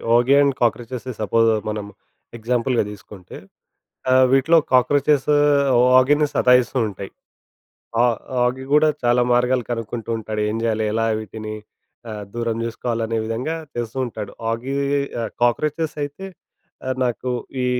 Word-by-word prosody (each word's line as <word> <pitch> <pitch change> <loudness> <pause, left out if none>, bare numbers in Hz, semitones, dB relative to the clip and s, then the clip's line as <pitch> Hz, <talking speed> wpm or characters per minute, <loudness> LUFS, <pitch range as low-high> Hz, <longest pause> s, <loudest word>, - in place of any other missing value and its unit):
'Oggy 120 +3 +4
and 140 -1 +3
cockroaches' 120 +1 -1
suppose 115 +2 +3 0.2
మనం 105 -1 -4 0.5
ఎగ్జాంపుల్‌గా 120 +1 0
తీసుకుంటే 95 -2 -12 0.7
ఆ! - - +5 0.2
వీటిలో 135 +5 +4
'కాక్రోచెస్ 140 +2 +3 0.7
ఓగిని' 145 +4 +4
సతాయిస్తు 125 +1 +3
ఉంటాయి. 100 -1 -8 0.9
ఆ - - +5 0.4
'ఓగి' 130 +2 -2
కూడా 150 +1 +5
చాలా 120 0 +3
మార్గాలు 125 +1 +2
కనుక్కుంటూ 115 -1 -5
ఉంటాడు 110 -1 -4
ఏం 105 - -2
చేయాలి 110 -1 0
ఎలా 115 0 +1
వీటిని 110 +1 -7 0.6
ఆహ్, 105 -1 -6
దూరం 115 -1 -2
చేసుకోవాలి 115 0 -3
అనే 115 0 -1
విధంగా 120 +8 -3 0.2
చేస్తూ 120 +1 -4
ఉంటాడు 105 -3 -7 0.2
'ఓగి‌గి 140 +4 -1 0.2
ఆహ్, 115 - -4
కాక్రోచెస్' 150 +6 0
అయితే 145 +7 -7 0.6
ఆ - - -1 0.2
నాకు 125 +1 -2 0.3
ఈ - - +1
120 Hz, 130 wpm, -21 LUFS, 110-135 Hz, 0.9 s, ఆ